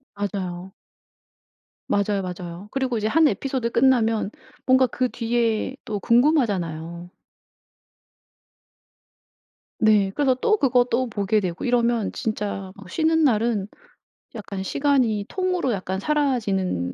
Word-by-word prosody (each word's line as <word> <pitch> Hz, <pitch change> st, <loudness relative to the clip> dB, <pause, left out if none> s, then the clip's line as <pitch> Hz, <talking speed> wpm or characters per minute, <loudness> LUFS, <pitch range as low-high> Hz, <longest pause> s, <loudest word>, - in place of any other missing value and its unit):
맞아요. 190 Hz, -2 st, -4 dB, 1.2 s
맞아요, 200 Hz, 0 st, +1 dB
맞아요. 180 Hz, +1 st, -7 dB
그리고 260 Hz, -3 st, -1 dB
이제 215 Hz, 0 st, -1 dB
한 315 Hz, +5 st, +4 dB
에피소드 260 Hz, -4 st, -2 dB
끝나면 230 Hz, -4 st, +2 dB, 0.4 s
뭔가 260 Hz, 0 st, +5 dB
그 255 Hz, 0 st, -1 dB
뒤에 235 Hz, +1 st, -1 dB
또 210 Hz, -2 st, -3 dB
궁금하잖아요. 185 Hz, -, +1 dB, 2.7 s
네. 210 Hz, -3 st, +4 dB
그래서 265 Hz, -3 st, +2 dB
또 425 Hz, +11 st, +2 dB
그거 250 Hz, -5 st, +3 dB
또 250 Hz, +2 st, +1 dB
보게 210 Hz, 0 st, +1 dB
되고 180 Hz, -3 st, -4 dB
이러면 235 Hz, -3 st, +1 dB
진짜 200 Hz, -3 st, -4 dB
막 195 Hz, -3 st, -13 dB
쉬는 320 Hz, -, +2 dB
날은 220 Hz, -5 st, +1 dB, 0.7 s
약간 200 Hz, -3 st, -6 dB
시간이 240 Hz, -2 st, +1 dB
통으로 365 Hz, -8 st, -1 dB
약간 190 Hz, -1 st, -3 dB
사라지는 200 Hz, -, 0 dB
220 Hz, 250 characters per minute, -23 LUFS, 195-260 Hz, 2.7 s, 뭔가